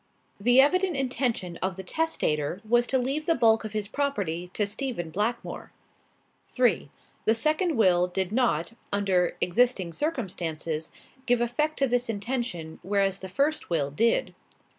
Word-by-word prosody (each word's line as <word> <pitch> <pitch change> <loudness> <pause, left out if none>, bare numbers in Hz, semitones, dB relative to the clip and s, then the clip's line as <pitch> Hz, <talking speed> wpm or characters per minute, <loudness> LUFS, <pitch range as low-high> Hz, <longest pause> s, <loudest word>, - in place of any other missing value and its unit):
The 245 +5 +4
evident 360 +5 +4
intention 245 -9 -1
of 185 -1 -2
the 190 - -7
testator 180 - -1
was 240 +2 +3
to 265 - +2
leave 270 +5 -2
the 330 - +3
bulk 225 -3 +4
of 215 -1 -6
his 210 -1 -2
property 200 - -2
to 210 - +1
Stephen 200 - -3
Blackmore. 215 +7 -3 0.8
"3. 235 - +1 0.4
The 220 - +4
second 310 +4 +1
will 180 -4 +4
did 185 +1 -2
not, 225 -6 +1 0.2
under 190 -3 +1
existing 185 -3 +2
circumstances, 170 - -3 0.4
give 245 -1 +3
effect 270 +6 0
to 275 - +3
this 245 -1 0
intention, 205 -7 -3
whereas 195 +1 0
the 190 - -7
first 285 +9 0
will 145 -5 0
did. 230 +11 +1
220 Hz, 145 wpm, -27 LUFS, 180-255 Hz, 0.8 s, The